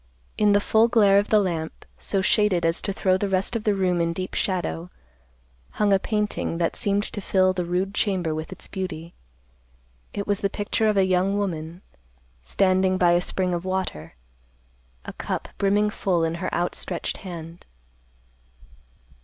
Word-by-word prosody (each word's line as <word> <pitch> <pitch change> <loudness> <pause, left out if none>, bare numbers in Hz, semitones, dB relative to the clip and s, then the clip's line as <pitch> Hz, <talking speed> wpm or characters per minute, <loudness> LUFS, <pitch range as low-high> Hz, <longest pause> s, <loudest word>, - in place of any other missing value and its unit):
In 210 -1 +3
the 205 - +5
full 220 +2 +3
glare 205 -4 +5
of 205 - -2
the 215 - +5
lamp, 170 -6 -2
so 195 - 0
shaded 190 -4 +3
as 165 0 +2
to 200 - -2
throw 185 -1 +1
the 200 +1 -2
rest 190 +4 0
of 225 - -3
the 210 -2 +2
room 180 -3 +1
in 170 0 0
deep 185 +2 -5
shadow, 90 - -2 0.8
hung 205 -1 +2
a 195 - +4
painting 210 -5 -1
that 165 -1 0
seemed 200 0 +1
to 205 - -5
fill 185 -1 +2
the 180 -1 -2
rude 180 +3 -1
chamber 185 -7 0
with 155 +1 -5
its - - -8
beauty. 170 -4 -5 1.0
It 200 - -4
was 205 -1 0
the 200 - 0
picture 210 +2 0
of 210 - +1
a 190 - +4
young 185 +2 +1
woman, 170 -3 -4 0.6
standing 185 - +2
by 175 -2 +4
a 175 0 +3
spring 180 0 -1
of 175 0 -2
water, 185 - -3 0.9
a - - -7
cup - - -4
brimming 205 +1 +2
full 180 -5 0
in 165 0 0
her 185 - -2
outstretched 175 0 -2
hand. 170 -2 -9
185 Hz, 170 wpm, -24 LUFS, 175-200 Hz, 1.0 s, the